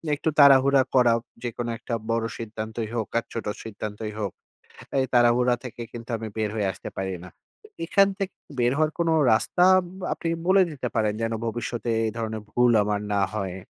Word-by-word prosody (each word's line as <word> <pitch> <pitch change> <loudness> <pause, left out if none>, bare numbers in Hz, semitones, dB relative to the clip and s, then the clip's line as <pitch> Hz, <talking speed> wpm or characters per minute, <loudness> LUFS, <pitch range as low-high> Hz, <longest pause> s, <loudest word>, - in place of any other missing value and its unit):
একটু 155 - -1
তাড়াহুড়া 140 -1 +7
করা, 125 -2 +5 0.3
যেকোনো 120 0 -3
একটা 120 - -6 0.2
বড় 115 0 0
সিদ্ধান্তই 110 0 -5
হোক 110 -3 -1
আর - - -8
ছোট 115 - -4 0.2
সিদ্ধান্তই 105 0 -6
হোক। 100 -4 -2 0.7
এই 130 - +2
তাড়াহুড়া 120 +1 +4
থেকে 120 -1 -7
কিন্তু 115 0 -9
আমি 110 0 -5
বের 110 -1 0
হয়ে 105 -3 0
আসতে 90 - -8
পারি 95 -1 -2
না। - - -9 0.3
তো 430 - -16 0.2
এখান 195 0 +4
থেকে 195 -2 -3 0.2
বের 120 0 +3
হওয়ার 155 0 +2
কোনো 165 -1 +2 0.2
রাস্তা 145 +10 +2 0.2
উম - - -10 0.3
আপনি 165 - -4 0.2
বলে 190 0 +6
দিতে 135 -5 -4
পারেন 110 -2 +2
যেন 115 0 -1
ভবিষ্যতে 115 +1 -3 0.2
এই - - 0
ধরনের 110 -1 -3
ভুল 125 0 +4
আমার 105 0 -1
না 100 - +2
হয়। 95 -3 -3
115 Hz, 185 wpm, -25 LUFS, 110-130 Hz, 0.7 s, তাড়াহুড়া